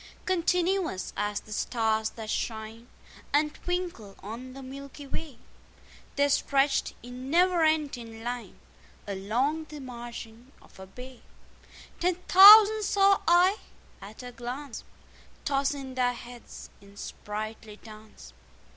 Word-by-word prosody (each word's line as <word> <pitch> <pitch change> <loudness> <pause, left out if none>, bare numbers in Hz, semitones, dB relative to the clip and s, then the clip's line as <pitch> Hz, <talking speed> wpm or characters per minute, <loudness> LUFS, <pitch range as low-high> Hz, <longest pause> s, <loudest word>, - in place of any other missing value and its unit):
Continuous 360 - 0
as 205 0 -2
the 215 - -10
stars 220 -1 0
that 220 -1 -7
shine 225 +1 -4 0.5
And 300 +1 +2
twinkle 350 - -4
on 240 +5 -8
the 270 0 -10
milky 275 +2 -9
way, 280 -2 -6 0.8
They 285 0 +3
stretched 275 0 +1
in 250 +2 -8
never 350 +1 +3
ending 270 -8 -1
line 245 0 -5 0.5
Along 240 +11 -1
the 300 -1 -10
margin 240 -1 -9
of - - -20
a 190 - -10
bay: 250 +5 -12 0.8
10 360 0 +1
Ten 360 - -23
thousand 425 +3 +9
saw 395 -1 +3
I 355 +4 +5 0.4
at 215 +5 -11
a 245 - -8
glance, 245 +2 -7 0.6
Tossing 275 -1 -1
their 250 -1 +1
heads 240 0 -11
in 200 0 -17
sprightly 215 +1 -7
dance. 215 - -14
255 Hz, 120 wpm, -28 LUFS, 225-315 Hz, 0.8 s, thousand